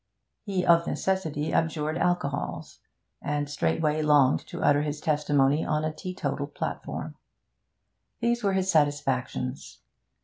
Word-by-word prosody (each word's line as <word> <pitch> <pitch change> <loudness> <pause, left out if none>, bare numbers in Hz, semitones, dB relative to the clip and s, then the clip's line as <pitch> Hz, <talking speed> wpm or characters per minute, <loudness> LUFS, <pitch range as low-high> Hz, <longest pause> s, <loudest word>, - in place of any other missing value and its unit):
He 190 -4 -2
of 170 -1 +5
necessity 160 -6 -1
abjured 155 -1 0
alcohols, 170 -5 -2 0.4
and 145 0 -1
straightway 150 - 0
longed 145 -3 +4
to - - -6
utter 145 0 +4
his 150 0 -3
testimony 145 -1 +2
on 155 0 0
a 155 - -2
teetotal 185 +2 -4
platform. - - -5 1.1
These 235 0 0
were 200 -1 +2
his 190 0 0
satisfactions. 135 -3 -1
150 Hz, 115 wpm, -27 LUFS, 145-175 Hz, 1.1 s, of